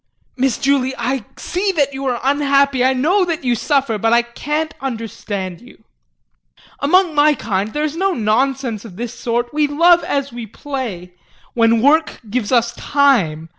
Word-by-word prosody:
Miss 260 -1 0
Julie, 265 -1 +1
I 250 -1 -2
see 385 +3 -1
that 285 -4 +1
you 270 +1 -5
are 245 -2 -1
unhappy, 280 -1 +2
I 260 - +4
know 335 +10 +2
that 340 -2 -3
you 245 -2 +1
suffer, 260 -3 0
but 225 +2 +1
I 235 0 +4
can't 295 +6 -3
understand 210 -7 -5
you. - - -18 1.0
Among 355 +4 +3
my 295 0 +4
kind 205 -2 -2
there 300 +4 -2
is 305 0 -2
no 385 +2 0
nonsense 235 0 0
of 215 -6 -11
this 235 +3 -5
sort; 240 +1 -2
we 300 0 +2
love 340 +4 +4
as 275 -2 -2
we 235 -2 -7
play 220 - -6 0.4
when 230 -1 +3
work 310 +3 +3
gives 220 +1 -2
us 235 -2 +2
time. 200 - +1
265 Hz, 170 wpm, -18 LUFS, 230-290 Hz, 1.0 s, I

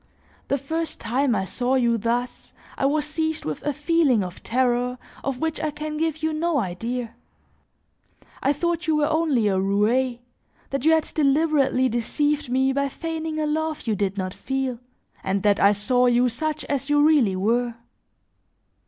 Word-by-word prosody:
The 280 - +1
first 320 +4 -3
time 245 +2 +1
I 190 - -1
saw 250 +6 -1
you 240 -3 +3
thus, 235 +3 -3 0.2
I 270 - +1
was 295 +1 +1
seized 315 +1 -2
with 155 -1 -4
a 295 - -1
feeling 295 - +2
of 180 -1 -8
terror 250 0 0 0.3
of 275 -2 -2
which 320 +2 -2
I 310 - -1
can 300 +1 -5
give 320 0 -2
you 315 0 +1
no 325 0 0
idea. 230 +3 -3 1.3
I 275 - +2
thought 340 +3 -1
you 315 - +3
were 300 -1 +2
only 310 -8 +2
a 190 -2 +1
roue, 220 +6 +1 0.5
that 275 0 -2
you 320 - +6
had 320 -1 +3
deliberately 285 -3 +2
deceived 290 +5 0
me 265 +1 +2
by 280 0 0
feigning 320 +1 -4
a 305 - 0
love 310 0 -2
you 220 -3 0
did 200 0 -1
not 185 -1 -3
feel, 265 -3 -3 0.4
and 190 0 -1
that 205 -1 +3
I 200 - +6
saw 245 +5 +2
you 245 +1 +3
such 310 +4 -2
as 280 0 -2
you 290 0 +4
really 265 -12 +3
were. 235 +5 0
265 Hz, 170 wpm, -24 LUFS, 235-310 Hz, 1.3 s, you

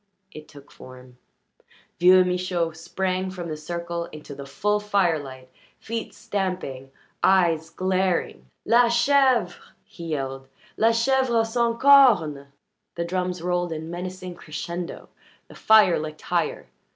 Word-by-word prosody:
It 155 -3 -11
took 145 -2 -16
form. 125 -1 -14 0.8
Vieux 185 +1 +6
Michaud 180 -2 -1
sprang 185 +3 -3
from 180 -2 -7
the 155 - -3
circle 170 +2 -5
into 150 -2 -11
the 140 0 -9
full 210 +9 0
firelight, 160 -11 -1 0.3
feet 225 0 -5
stamping, 185 - -4 0.3
eyes 170 -4 +3
glaring. 185 - -1 0.2
"La 235 +1 +4
ch 235 0 +2
vre!" 260 -10 +3 0.3
he 170 - -11
yelled. 135 -4 -4 0.3
"La 225 - +3
chèvre 235 0 +2
sans 230 0 -1
cornes!" 215 - +5 0.5
The 170 - -3
drums 180 -1 -3
rolled 175 -1 -1
in 160 +1 -6
menacing 180 +1 -6
crescendo, 170 +1 -7 0.4
the - - -15
fire 215 -5 +4
licked 155 0 -7
higher. 170 -3 -2
180 Hz, 125 wpm, -24 LUFS, 155-205 Hz, 0.8 s, Vieux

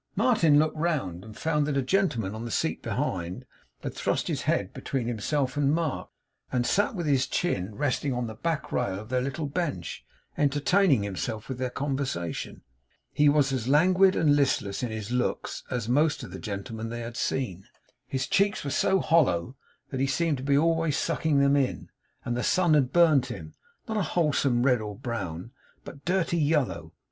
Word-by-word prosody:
Martin 165 -12 +4
looked 155 +1 +2
round, 150 - -1
and 110 0 -11
found 150 -2 0
that 145 -2 0
a - - +3
gentleman, 125 - 0
on 110 +1 -6
the 120 - -5
seat - - -1
behind, 90 0 -3 0.4
had - - -4
thrust - - -1
his - - -1
head - - 0
between 130 -4 -3
himself 125 +4 -1
and 145 0 +2
Mark, 165 -4 -2 0.4
and 120 -1 +1
sat 205 - +1
with 175 -3 -3
his 135 -3 +2
chin 105 - -1
resting 145 +1 0
on 125 -1 -1
the 110 - -6
back 160 +7 -3
rail 100 -6 -1
of 110 +2 -10
their 125 0 +1
little 140 +4 -3
bench, 140 - -3 0.4
entertaining 145 - +3
himself 105 +3 -4
with 130 -2 -5
their 130 -1 -1
conversation. 130 - -3 0.5
He 150 0 +4
was 145 -2 +3
as 125 -3 -2
languid 185 +7 +5
and 145 -2 +4
listless 135 -8 +1
in 125 - -2
his 110 0 -5
looks 125 0 -2
as 120 -3 -2
most 145 +5 +2
of - - -8
the - - -7
gentlemen 110 +2 -5
they 120 +1 -5
had 115 0 -6
seen; 100 -8 -2 0.4
his 130 -1 -2
cheeks 200 +1 +1
were 140 - -3
so 190 +5 +2
hollow 130 - +2 0.4
that 130 - -3
he 135 - +2
seemed 155 +2 +1
to 130 - -7
be 140 0 +3
always 165 -1 +2
sucking 160 -3 0
them 140 0 +4
in; 135 -3 -1 0.4
and 120 - -1
the 125 - -1
sun 175 +4 +3
had 135 -4 +3
burnt 155 -6 +5
him, 120 - -8 0.3
not 220 -1 -2
a - - +2
wholesome 145 -8 +1
red 125 -3 +3
or 105 -1 -5
brown, 100 -5 -5 0.3
but 140 - -11
dirty 175 -2 +1
yellow. 150 -3 0
135 Hz, 190 wpm, -27 LUFS, 120-155 Hz, 0.5 s, languid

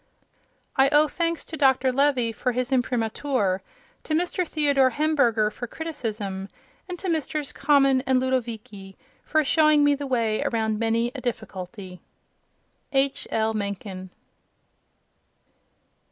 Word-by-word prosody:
I 270 0 +5
owe 300 +1 +5
thanks 335 +1 -2
to 320 - -7
Dr. 265 -3 +3
Levy 265 -4 +2
for 245 +3 -2
his 250 +2 -2
imprimatur, 245 -5 0 0.4
to 310 - -3
Mr. 355 +1 0
Theodor 285 -4 +3
Hemberger 245 -7 +2
for 245 - -6
criticism, 215 -11 -5 0.4
and 360 - -4
to 380 - -5
Messrs. 305 -3 -1
Common 275 -2 +3
and 260 -1 +3
Ludovici 225 -6 -3 0.3
for 310 0 +1
showing 305 0 +4
me 290 0 +5
the 285 0 -4
way 230 -4 0
around 220 -2 -1
many 230 +1 +1
a 265 - -7
difficulty. 190 -5 -6 0.9
H. 270 0 +1
L. 220 0 0
Mencken. 200 -2 -5
255 Hz, 125 wpm, -25 LUFS, 220-290 Hz, 0.9 s, I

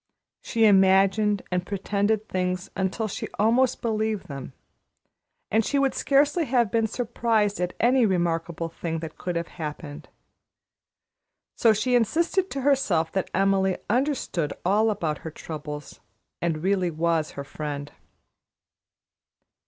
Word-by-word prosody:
She 225 -1 +2
imagined 195 +1 +4
and 180 -1 0
pretended 205 +2 -1
things 180 0 -2
until 190 +4 -1
she 200 - -5
almost 235 +5 +2
believed 220 -2 -1
them, 135 -2 -7 1.0
and 225 +2 +3
she 285 - 0
would 275 -1 +2
scarcely 290 +4 +2
have 240 -5 +1
been 225 -1 +2
surprised 220 -4 0
at 180 0 -2
any 245 0 +4
remarkable 170 -2 -1
thing 165 0 -4
that 160 -1 -8
could 180 -1 -3
have 170 0 -2
happened. 150 -1 -6 1.5
So 230 - +4
she 220 +4 0
insisted 335 - +2
to 275 - -4
herself 235 - +2
that 190 - -2
Emily 190 0 +2
understood 245 - 0
all 210 +4 +3
about 165 -8 -2
her 160 - -6
troubles 150 -2 -8 0.4
and 170 -2 0
was 155 - -9
really 190 -2 +1
her 160 -3 -1
friend. 145 0 -6
195 Hz, 130 wpm, -25 LUFS, 170-225 Hz, 1.5 s, imagined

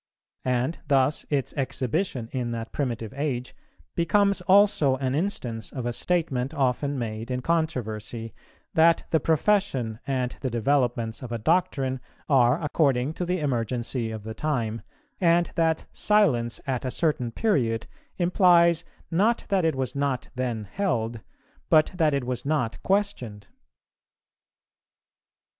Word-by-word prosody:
And 125 +6 0
thus 135 +1 +2
its 140 -4 0
exhibition 130 - -1
in 125 -2 -2
that 115 -1 -5
primitive 120 -6 -3
age 135 -4 -3 0.4
becomes 200 +3 +2
also 185 -7 +4
an 130 -1 -2
instance 130 - -3
of 125 -3 -5
a 120 - -1
statement 150 -4 -1
often 140 +1 0
made 115 -1 -4
in 125 0 -2
controversy, 115 -9 -2 0.4
that 165 +1 +4
the 160 - +4
profession 155 - +1
and 130 -2 0
the 130 - -1
developments 120 -2 0
of 125 -3 -7
a 115 - -1
doctrine 135 -1 +1 0.3
are 130 0 +4
according 140 -2 +1
to 180 - -3
the 180 -1 0
emergency 120 -2 -1
of 110 -2 -6
the 110 +1 -6
time, 115 -5 -2 0.4
and 170 -1 +3
that 160 -1 +1
silence 135 - +2
at 130 -3 -2
a 130 - -1
certain 125 -5 0
period 115 - 0 0.3
implies, 175 -2 +4 0.3
not 210 +8 +2
that 195 -3 +2
it 160 -2 +2
was 130 -1 -3
not 140 -3 -1
then 125 -4 -2
held, 115 - -2 0.5
but 155 -1 +5
that 160 -5 +2
it 140 - -1
was 125 -1 -3
not 140 -6 -1
questioned. 190 - -1
135 Hz, 135 wpm, -26 LUFS, 120-165 Hz, 0.5 s, but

